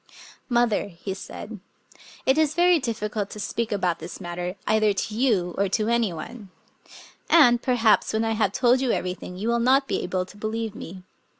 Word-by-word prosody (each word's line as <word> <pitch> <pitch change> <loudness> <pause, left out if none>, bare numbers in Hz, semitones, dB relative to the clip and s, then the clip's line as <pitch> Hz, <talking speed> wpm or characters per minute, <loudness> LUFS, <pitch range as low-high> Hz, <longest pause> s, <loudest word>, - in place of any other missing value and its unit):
" - - -24
Mother," 240 -4 +2
he 190 +1 -6
said, 205 +2 -8 0.3
" - - -21
it 265 - +4
is 310 -1 +2
very 350 0 +4
difficult 215 -5 -3
to 210 - -9
speak 230 +2 -3
about 185 -4 0
this 165 +3 -8
matter, 175 0 -5
either 215 -1 +3
to 200 +2 -3
you 210 -7 +1
or 200 -1 +2
to 215 +3 0
any 235 -4 +2
one; 195 +6 -8 0.8
and, 245 -8 +6
perhaps, 235 -4 +3
when 220 +1 0
I 225 - 0
have 215 -3 +1
told 250 +4 +3
you 260 -3 +1
everything, 180 0 -4
you 205 +4 -3
will 235 0 +2
not 265 +3 +3
be - - -1
able 185 -1 -2
to 190 - -15
believe 220 0 -3
me. 185 -2 -9
215 Hz, 195 wpm, -24 LUFS, 190-240 Hz, 0.8 s, and